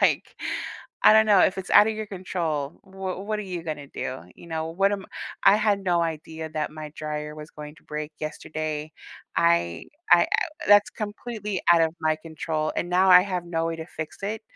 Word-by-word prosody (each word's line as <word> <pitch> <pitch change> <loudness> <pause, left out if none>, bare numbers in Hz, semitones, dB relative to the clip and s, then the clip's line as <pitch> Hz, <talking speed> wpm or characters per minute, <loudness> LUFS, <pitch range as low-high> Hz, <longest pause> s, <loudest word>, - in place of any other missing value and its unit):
like - - +2 0.7
I - - +9
don't 220 0 +6
know, 205 -3 +6
if 190 - +3
it's 190 - -6
outta 210 +2 +7
your 215 0 -5
control, 170 -6 -3
w 190 -1 -5
what 215 +1 -2
are 210 - -3
you 180 -3 -5
gonna 150 -3 -5
do? 130 -1 -5
You 170 - -14
know? 160 -1 -2
What 195 +4 +2
am 195 -2 -4 0.4
I - - +8
had 210 -2 +2
no 175 -2 +2
idea 160 0 -4
that 155 -1 -2
my 155 -1 -7
dryer 150 0 -4
was 150 0 -9
going 150 0 -10
to - - -21
break 150 0 -5
yesterday, 155 0 -4 0.5
I 85 0 +2 0.3
I - - +8
I - - +1 0.4
that's 205 0 +6
completely 210 -1 -5
out 165 -1 +5
of 160 0 +1
my 155 0 +1
control, 155 -1 -3
and 175 - -1
now 185 +2 +4
I 180 0 +10
have 180 -3 -3
no 165 -1 -1
way 165 0 -2
to 160 0 -7
fix 160 -3 -7
it 215 +2 -3
165 Hz, 200 wpm, -25 LUFS, 155-195 Hz, 0.7 s, I